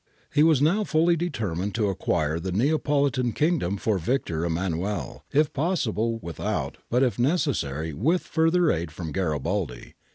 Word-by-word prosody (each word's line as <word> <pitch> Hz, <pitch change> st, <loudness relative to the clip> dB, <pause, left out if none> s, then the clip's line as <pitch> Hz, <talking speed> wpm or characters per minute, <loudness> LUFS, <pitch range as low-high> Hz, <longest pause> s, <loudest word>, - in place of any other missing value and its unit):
He 150 Hz, -, +4 dB
was 155 Hz, -3 st, +5 dB
now 195 Hz, +8 st, +3 dB
fully 170 Hz, -1 st, +3 dB
determined 105 Hz, -, -2 dB
to 110 Hz, -3 st, +1 dB
acquire 80 Hz, -4 st, 0 dB
the 95 Hz, +2 st, -4 dB
Neapolitan 140 Hz, -, +1 dB
kingdom 150 Hz, -, +1 dB
for 100 Hz, -1 st, 0 dB
Victor 85 Hz, -5 st, -1 dB
Emmanuel, 85 Hz, +3 st, -2 dB
if 150 Hz, +1 st, +2 dB
possible 120 Hz, -, 0 dB
without, 85 Hz, -3 st, -3 dB
but 125 Hz, +3 st, +3 dB
if 125 Hz, -2 st, 0 dB
necessary 120 Hz, -, 0 dB
with 155 Hz, -, +1 dB
further 165 Hz, +1 st, +2 dB
aid 85 Hz, +1 st, -2 dB
from 80 Hz, 0 st, -6 dB
Garibaldi. 80 Hz, -4 st, -2 dB
115 Hz, 140 wpm, -25 LUFS, -, -, was